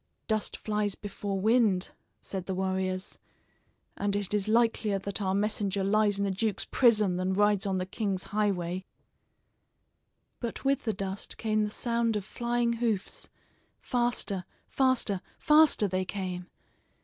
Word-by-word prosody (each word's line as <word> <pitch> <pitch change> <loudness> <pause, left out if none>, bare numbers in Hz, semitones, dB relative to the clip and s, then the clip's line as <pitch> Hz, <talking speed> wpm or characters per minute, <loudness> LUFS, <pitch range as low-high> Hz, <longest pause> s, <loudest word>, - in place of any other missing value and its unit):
"Dust 215 -2 0
flies 210 -2 -1
before 200 -1 -4
wind," 215 -3 +3 0.3
said 190 -2 -5
the 190 - -2
warriors, 190 0 -2 0.8
"and 200 0 -1
it 205 -1 -2
is 210 -1 +1
likelier 225 -2 +2
that 200 +1 -4
our 190 -1 +1
messenger 200 -1 0
lies 205 0 +3
in 200 - 0
the 195 - 0
duke's 210 +2 -1
prison 215 -7 +3
than 185 +1 0
rides 205 -1 +3
on 190 -1 0
the 185 - -1
king's 195 -1 -2
highway." 185 -4 0 1.6
But 235 +2 -5
with 275 -1 +1
the 220 - +1
dust 195 0 -5
came 215 -1 +1
the - - -3
sound 235 0 0
of 205 -2 -2
flying 235 +1 0
hoofs. 220 -5 -1 0.5
Faster, 240 -6 0 0.3
faster, 255 -8 +2 0.2
faster, 300 -8 +5
they 185 0 -1
came. 180 -2 -4
205 Hz, 140 wpm, -29 LUFS, 190-220 Hz, 1.6 s, faster